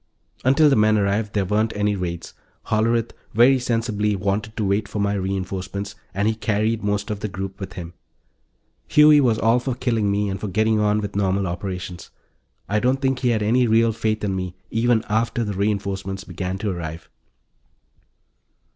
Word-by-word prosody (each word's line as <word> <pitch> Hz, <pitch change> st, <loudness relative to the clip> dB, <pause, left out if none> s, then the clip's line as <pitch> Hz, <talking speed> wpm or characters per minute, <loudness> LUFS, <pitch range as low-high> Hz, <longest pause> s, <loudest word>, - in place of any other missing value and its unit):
Until 140 Hz, +4 st, +5 dB
the 140 Hz, -, +4 dB
men 110 Hz, 0 st, +4 dB
arrived, 105 Hz, +1 st, 0 dB
there 100 Hz, -2 st, +1 dB
weren't 105 Hz, +3 st, 0 dB
any 105 Hz, 0 st, +1 dB
raids; 85 Hz, -3 st, -5 dB, 0.4 s
Hollerith, 115 Hz, +1 st, +1 dB, 0.2 s
very 130 Hz, +4 st, +6 dB
sensibly, 115 Hz, -4 st, 0 dB
wanted 100 Hz, +3 st, -2 dB
to 110 Hz, -, 0 dB
wait 100 Hz, +2 st, 0 dB
for 105 Hz, -, -6 dB
my 100 Hz, 0 st, +1 dB
reinforcements, 95 Hz, +1 st, -3 dB, 0.2 s
and 100 Hz, +2 st, 0 dB
he 110 Hz, -, +2 dB
carried 110 Hz, 0 st, -1 dB
most 105 Hz, 0 st, -1 dB
of 105 Hz, -, -3 dB
the 105 Hz, -, -3 dB
group 95 Hz, 0 st, -6 dB
with 95 Hz, -3 st, -6 dB
him. 85 Hz, -1 st, -8 dB, 0.9 s
Huey 150 Hz, 0 st, +6 dB
was 120 Hz, -5 st, +2 dB
all 115 Hz, +2 st, +3 dB
for 125 Hz, 0 st, -3 dB
killing 115 Hz, -5 st, 0 dB
me 100 Hz, +1 st, +1 dB
and 95 Hz, +1 st, -4 dB
getting 110 Hz, 0 st, +2 dB
on 105 Hz, 0 st, +2 dB
with 100 Hz, -1 st, -5 dB
normal 100 Hz, -1 st, +1 dB
operations; 90 Hz, -1 st, -5 dB, 0.6 s
I 105 Hz, +2 st, +1 dB
don't 130 Hz, +4 st, +1 dB
think 135 Hz, -1 st, 0 dB
he 125 Hz, -, +1 dB
had 110 Hz, -3 st, +1 dB
any 120 Hz, +4 st, +3 dB
real 115 Hz, +1 st, +4 dB
faith 110 Hz, -1 st, -1 dB
in 100 Hz, -2 st, 0 dB
me 90 Hz, -1 st, -4 dB, 0.2 s
even 115 Hz, 0 st, +2 dB
after 115 Hz, +2 st, 0 dB
the 105 Hz, -2 st, -3 dB
reinforcements 100 Hz, -1 st, -2 dB
began 95 Hz, -2 st, -4 dB
to 100 Hz, 0 st, -2 dB
arrive. 80 Hz, -2 st, -6 dB
105 Hz, 175 wpm, -22 LUFS, 95-115 Hz, 0.9 s, very